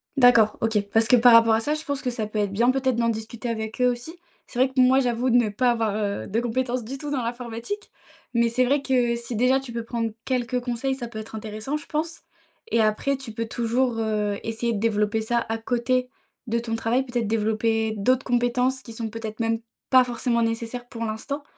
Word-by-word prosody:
D'accord, 240 Hz, -5 st, +5 dB
OK. 225 Hz, -2 st, +2 dB
Parce 225 Hz, +1 st, +3 dB
que 250 Hz, -, +6 dB
par 240 Hz, 0 st, +7 dB
rapport 230 Hz, -1 st, +7 dB
à 220 Hz, -, +3 dB
ça, 295 Hz, +6 st, -1 dB
je 310 Hz, -, -6 dB
pense 285 Hz, -2 st, -3 dB
que 250 Hz, -, -1 dB
ça 230 Hz, -3 st, -3 dB
peut 215 Hz, 0 st, -3 dB
être 200 Hz, -1 st, 0 dB
bien 240 Hz, +5 st, +3 dB
peut-être 260 Hz, -2 st, 0 dB
d'en 235 Hz, 0 st, +1 dB
discuter 225 Hz, +2 st, -4 dB
avec 220 Hz, +1 st, -4 dB
eux, 250 Hz, -, +5 dB
aussi. 245 Hz, +8 st, -7 dB, 0.3 s
C'est 245 Hz, -, -9 dB
vrai 260 Hz, -, +4 dB
que 265 Hz, 0 st, -2 dB
moi, 255 Hz, +1 st, +6 dB
j'avoue 245 Hz, 0 st, 0 dB
de 240 Hz, -, +3 dB
ne 235 Hz, -3 st, +4 dB
pas 245 Hz, +4 st, +2 dB
avoir, 225 Hz, -3 st, 0 dB
heu, 200 Hz, -, -2 dB
de 220 Hz, +4 st, 0 dB
compétence 245 Hz, +1 st, -1 dB
du 265 Hz, +5 st, -6 dB
tout 290 Hz, +1 st, -6 dB
dans 265 Hz, -3 st, 0 dB
l'informatique, 240 Hz, -, -5 dB, 0.4 s
mais 235 Hz, 0 st, +3 dB
c'est 255 Hz, +2 st, +2 dB
vrai 280 Hz, +2 st, +2 dB
que, 245 Hz, -3 st, +1 dB
si 235 Hz, 0 st, -5 dB
déjà 255 Hz, +4 st, +3 dB
tu 265 Hz, -3 st, -9 dB
peux 235 Hz, -1 st, -3 dB
prendre 230 Hz, -1 st, -2 dB
quelques 250 Hz, -1 st, 0 dB
conseils, 250 Hz, +2 st, -2 dB
ça 240 Hz, -3 st, -5 dB
peut 220 Hz, -2 st, -7 dB
être 220 Hz, 0 st, -8 dB
intéressant, 215 Hz, +5 st, -4 dB
je 300 Hz, -, -10 dB
pense, 320 Hz, +1 st, -3 dB, 0.5 s
et 230 Hz, -, +3 dB
après 220 Hz, +6 st, +1 dB
tu 265 Hz, -4 st, -8 dB
peux 230 Hz, +1 st, -3 dB
toujours, 235 Hz, +1 st, 0 dB
heu, 210 Hz, -2 st, 0 dB
essayer 225 Hz, +1 st, -2 dB
de 205 Hz, -, -2 dB
développer 210 Hz, -1 st, +1 dB
ça 235 Hz, +1 st, 0 dB
à 225 Hz, -, 0 dB
côté 250 Hz, +2 st, 0 dB, 0.4 s
de 235 Hz, +1 st, 0 dB
ton 230 Hz, -1 st, -3 dB
travail, 235 Hz, +4 st, +1 dB
peut-être 240 Hz, -3 st, -2 dB
développer 220 Hz, 0 st, +1 dB
d'autres 255 Hz, +6 st, +2 dB
compétences 250 Hz, +1 st, +1 dB
qui 230 Hz, -3 st, -10 dB
sont 225 Hz, -1 st, -4 dB
peut-être 220 Hz, 0 st, -7 dB
même, 225 Hz, 0 st, +1 dB, 0.3 s
pas 255 Hz, -1 st, +7 dB
forcément 240 Hz, -1 st, 0 dB
nécessaires 230 Hz, +2 st, -2 dB
pour 230 Hz, -1 st, -6 dB
l'instant 250 Hz, +7 st, -4 dB
235 Hz, 230 wpm, -24 LUFS, 225-255 Hz, 0.5 s, par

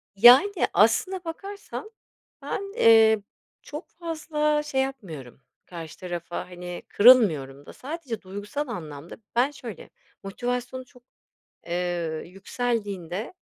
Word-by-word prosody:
Yani, 245 Hz, -, +8 dB, 0.2 s
aslında 375 Hz, -1 st, +3 dB
bakarsan 400 Hz, +5 st, -7 dB, 0.5 s
ben, 395 Hz, 0 st, -4 dB
eee, 220 Hz, -, +6 dB, 0.4 s
çok 300 Hz, +4 st, -8 dB
fazla 310 Hz, -3 st, -1 dB
şey 270 Hz, -3 st, 0 dB
yapmıyorum, 165 Hz, -, -6 dB, 0.2 s
karşı 165 Hz, -3 st, -9 dB
tarafa, 175 Hz, 0 st, -5 dB
hani, 180 Hz, 0 st, -7 dB
kırılmıyorum 160 Hz, -, +5 dB
da. -, -, -11 dB
Sadece 275 Hz, -5 st, -6 dB
duygusal 205 Hz, +10 st, -5 dB
anlamda 160 Hz, -, -7 dB, 0.2 s
Ben 250 Hz, +4 st, +3 dB
şöyle, 245 Hz, -, -9 dB, 0.3 s
motivasyonu 245 Hz, +5 st, -4 dB
çok, 250 Hz, 0 st, -21 dB, 0.6 s
eee, 175 Hz, -2 st, -2 dB
yükseldiğinde, 200 Hz, -, -3 dB
225 Hz, 100 wpm, -26 LUFS, 175-285 Hz, 0.6 s, Yani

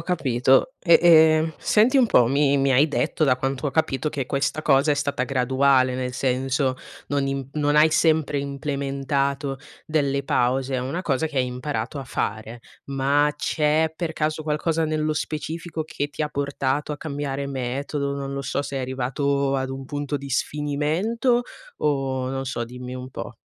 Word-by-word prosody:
capito. 135 Hz, -, +2 dB
E 170 Hz, -3 st, +6 dB
e 160 Hz, -2 st, +6 dB
senti 235 Hz, +6 st, +3 dB
un 245 Hz, -, +5 dB
po', 125 Hz, -, +4 dB
mi 140 Hz, +1 st, +3 dB
mi 135 Hz, 0 st, +2 dB
hai 140 Hz, +5 st, +4 dB
detto 155 Hz, +1 st, 0 dB
da 130 Hz, -3 st, +3 dB
quanto 135 Hz, +2 st, -2 dB
ho 140 Hz, -, -1 dB
capito 135 Hz, -1 st, 0 dB
che 145 Hz, -3 st, -3 dB
questa 140 Hz, +4 st, -1 dB
cosa 140 Hz, -1 st, +3 dB
è -, -, +4 dB
stata 140 Hz, -2 st, -1 dB
graduale, 130 Hz, 0 st, +2 dB
nel 125 Hz, 0 st, -3 dB
senso 130 Hz, +1 st, 0 dB, 0.3 s
non 140 Hz, -1 st, 0 dB
im 135 Hz, -1 st, -3 dB
non 150 Hz, -1 st, +1 dB
hai 155 Hz, +1 st, +6 dB
sempre 155 Hz, -2 st, +2 dB
implementato 140 Hz, 0 st, -2 dB, 0.3 s
delle 140 Hz, -3 st, 0 dB
pause, 130 Hz, +1 st, +1 dB
è -, -, 0 dB
una 140 Hz, +8 st, -3 dB
cosa 160 Hz, -4 st, 0 dB
che 150 Hz, -, -8 dB
hai 130 Hz, -, +3 dB
imparato 125 Hz, +1 st, -4 dB
a 135 Hz, -, -5 dB
fare. 110 Hz, -1 st, -4 dB, 0.3 s
Ma 140 Hz, +2 st, +2 dB
c'è 155 Hz, +1 st, +1 dB
per 160 Hz, -1 st, -4 dB
caso 155 Hz, 0 st, -1 dB
qualcosa 160 Hz, +1 st, 0 dB
nello 155 Hz, 0 st, 0 dB
specifico 160 Hz, +2 st, -4 dB
che 145 Hz, -2 st, -3 dB
ti 145 Hz, -, -4 dB
ha 150 Hz, -, -1 dB
portato 140 Hz, 0 st, -2 dB
a -, -, -4 dB
cambiare 140 Hz, -2 st, -4 dB
metodo? 140 Hz, +2 st, -3 dB
Non 140 Hz, -1 st, -4 dB
lo 140 Hz, -, -3 dB
so, 140 Hz, +1 st, -2 dB
sei 140 Hz, -1 st, -4 dB
arrivato 135 Hz, +2 st, -1 dB
ad 130 Hz, 0 st, -2 dB
un 135 Hz, 0 st, -6 dB
punto 145 Hz, +1 st, -3 dB
di 140 Hz, 0 st, -8 dB
sfinimento? 155 Hz, -, 0 dB, 0.4 s
O 135 Hz, -3 st, -1 dB
non 135 Hz, 0 st, -3 dB
so 125 Hz, -2 st, -3 dB
dimmi 125 Hz, +1 st, -8 dB
un 130 Hz, 0 st, -7 dB
po'? -, -, -7 dB
140 Hz, 175 wpm, -23 LUFS, 135-155 Hz, 0.4 s, E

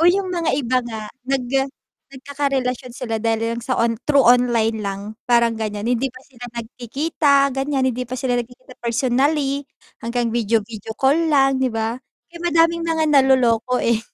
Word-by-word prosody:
Oh, 335 Hz, -, +6 dB
yung 375 Hz, 0 st, +1 dB
mga 335 Hz, -2 st, 0 dB
iba 255 Hz, -2 st, +1 dB
nga 220 Hz, -3 st, -7 dB, 0.2 s
nag 270 Hz, -2 st, 0 dB, 0.7 s
nagkakarelasyon 265 Hz, -2 st, -2 dB
sila 235 Hz, -3 st, -3 dB
dahil 225 Hz, 0 st, 0 dB, 0.2 s
lang 235 Hz, -, -6 dB
sa 255 Hz, -, -2 dB
on 230 Hz, -1 st, +1 dB
through 285 Hz, -2 st, +4 dB
online 235 Hz, -3 st, +3 dB
lang 195 Hz, 0 st, -3 dB, 0.2 s
parang 235 Hz, -2 st, +3 dB
ganyan. 210 Hz, -1 st, -4 dB
Hindi 250 Hz, +1 st, 0 dB
pa 255 Hz, -, -13 dB
sila 245 Hz, -3 st, -13 dB, 0.2 s
nagkikita 280 Hz, +6 st, -1 dB, 0.2 s
ganyan, 270 Hz, -1 st, 0 dB
hindi 250 Hz, 0 st, -3 dB
pa 250 Hz, +1 st, -6 dB
sila 245 Hz, -1 st, 0 dB
nagkikita 250 Hz, +2 st, -7 dB
personally 270 Hz, +4 st, 0 dB, 0.4 s
hanggang 235 Hz, 0 st, -1 dB
video 225 Hz, -1 st, +1 dB
video 220 Hz, 0 st, -8 dB
call 270 Hz, +2 st, +3 dB
lang, 270 Hz, -2 st, +3 dB
'di 260 Hz, -, +2 dB
ba? 225 Hz, +1 st, -2 dB, 0.3 s
Kaya 340 Hz, 0 st, -12 dB
madami 335 Hz, -1 st, +3 dB
ang 335 Hz, -, -3 dB
mga 320 Hz, -1 st, +1 dB
naloloko, 250 Hz, -3 st, +3 dB
eh. 230 Hz, -1 st, +1 dB
250 Hz, 170 wpm, -21 LUFS, 230-275 Hz, 0.7 s, Oh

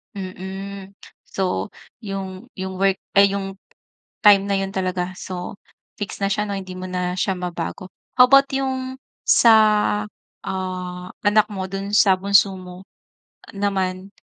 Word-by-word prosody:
Mm. 190 Hz, +1 st, -7 dB, 0.3 s
So 180 Hz, -, -1 dB, 0.3 s
yung 195 Hz, -3 st, -6 dB
yung 190 Hz, 0 st, -5 dB
work 195 Hz, -1 st, +3 dB, 0.2 s
ay 200 Hz, 0 st, +5 dB
yung 195 Hz, -1 st, -5 dB, 0.7 s
time 200 Hz, -1 st, +8 dB
na 195 Hz, -, +2 dB
'yon 195 Hz, 0 st, -3 dB
talaga, 185 Hz, -1 st, -2 dB
so 180 Hz, 0 st, -6 dB, 0.4 s
fix 205 Hz, 0 st, -6 dB
na 195 Hz, -, 0 dB
siya 200 Hz, +1 st, 0 dB
'no, 200 Hz, -1 st, -3 dB
hindi 185 Hz, -1 st, -8 dB
mo 185 Hz, 0 st, -7 dB
na 180 Hz, 0 st, -2 dB
siya 190 Hz, 0 st, -1 dB
mabago. 175 Hz, +1 st, -5 dB, 0.3 s
How 250 Hz, -, +9 dB
about 275 Hz, +1 st, +6 dB
yung 260 Hz, -1 st, -2 dB, 0.2 s
sa, 230 Hz, -, +5 dB, 0.9 s
ah, 185 Hz, -1 st, -4 dB, 0.2 s
anak 210 Hz, +1 st, +4 dB
mo? 190 Hz, -3 st, -5 dB
Dun 195 Hz, +1 st, -4 dB
sa 190 Hz, -3 st, +5 dB
bunso 200 Hz, 0 st, +3 dB
mo 180 Hz, 0 st, -10 dB, 0.7 s
naman 195 Hz, -1 st, -2 dB
195 Hz, 140 wpm, -22 LUFS, 185-200 Hz, 0.9 s, How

